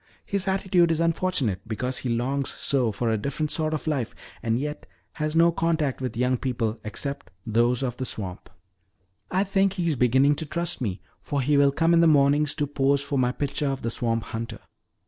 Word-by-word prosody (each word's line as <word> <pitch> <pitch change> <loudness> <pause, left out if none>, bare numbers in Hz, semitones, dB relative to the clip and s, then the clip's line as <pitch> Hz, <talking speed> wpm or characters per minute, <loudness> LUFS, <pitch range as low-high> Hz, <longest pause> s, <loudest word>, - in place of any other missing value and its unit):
His 200 -1 0
attitude 190 -3 +3
is 165 -1 +1
unfortunate 165 - 0
because 125 +4 -2
he 125 - -3
longs 130 +4 -1
so 130 -5 +1
for 115 +3 -1
a 110 - 0
different 145 +6 -2
sort 155 -1 0
of 155 - -3
life 140 -7 -2 0.3
and 115 0 0
yet 150 +3 -4 0.2
has 155 0 -3
no 170 +1 +5
contact 160 -5 0
with 125 -3 -3
young 125 +1 +2
people 115 -3 -2
except 140 +1 -4 0.2
those 120 +3 +2
of 125 -2 -2
the 130 - -3
swamp. 95 -6 -5 0.8
I 190 +1 +2
think 195 -1 +2
he 180 -3 -2
is 160 - +1
beginning 130 +3 +4
to 160 - -2
trust 170 +1 -1
me, 100 -6 -2 0.2
for 145 - -2
he 145 +3 +2
will 140 0 +5
come 165 +4 +2
in 170 - +5
the 170 - +6
mornings 145 0 +4
to 150 - 0
pose 140 0 +1
for 140 -1 -1
my 125 -1 +2
picture 145 +2 -2
of 135 -1 -2
the 115 - -1
swamp 115 -1 -1
hunter. 115 0 -6
140 Hz, 205 wpm, -25 LUFS, 120-160 Hz, 0.8 s, the